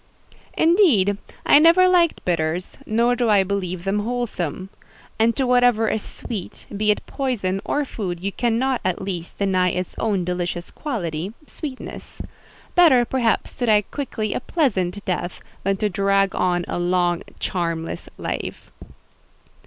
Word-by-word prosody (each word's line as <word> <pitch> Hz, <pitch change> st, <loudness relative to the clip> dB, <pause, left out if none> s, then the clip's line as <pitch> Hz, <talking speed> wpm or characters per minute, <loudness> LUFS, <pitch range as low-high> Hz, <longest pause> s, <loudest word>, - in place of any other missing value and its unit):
"Indeed, 285 Hz, -, +4 dB, 0.3 s
I 285 Hz, -, +7 dB
never 340 Hz, +4 st, +6 dB
liked 350 Hz, -3 st, +3 dB
bitters; 170 Hz, 0 st, -1 dB
nor 235 Hz, +3 st, +2 dB
do 240 Hz, -2 st, +1 dB
I 205 Hz, -2 st, +5 dB
believe 185 Hz, -2 st, -3 dB
them 195 Hz, +2 st, 0 dB
wholesome. 205 Hz, -6 st, -3 dB, 0.5 s
And 225 Hz, +1 st, +3 dB
to 265 Hz, -, +1 dB
whatever 245 Hz, -3 st, +4 dB
is 220 Hz, -, -1 dB
sweet, 205 Hz, -4 st, -7 dB
be 210 Hz, +1 st, 0 dB
it 210 Hz, -, +1 dB
poison 200 Hz, -8 st, -2 dB
or 290 Hz, 0 st, 0 dB
food, 185 Hz, -9 st, -4 dB
you 195 Hz, +3 st, -3 dB
cannot, 245 Hz, +4 st, 0 dB
at 185 Hz, -2 st, 0 dB
least, 180 Hz, -3 st, -5 dB
deny 185 Hz, -2 st, +2 dB
its 180 Hz, 0 st, -3 dB
own 200 Hz, -5 st, 0 dB
delicious 175 Hz, -1 st, -3 dB
quality—sweetness. 235 Hz, -, -6 dB, 0.5 s
Better, 295 Hz, -9 st, +6 dB
perhaps, 235 Hz, -3 st, 0 dB
to 245 Hz, -, -1 dB
die 210 Hz, -1 st, +5 dB
quickly 225 Hz, -7 st, -3 dB
a -, -, -1 dB
pleasant 205 Hz, -, -1 dB
death, 180 Hz, -1 st, -2 dB, 0.2 s
than 195 Hz, +1 st, +1 dB
drag 195 Hz, -1 st, +1 dB
on 175 Hz, -1 st, +1 dB
long 175 Hz, 0 st, +1 dB
a -, -, -17 dB
charmless 165 Hz, -2 st, -3 dB
life." -, -, -5 dB
205 Hz, 135 wpm, -22 LUFS, 180-245 Hz, 0.5 s, I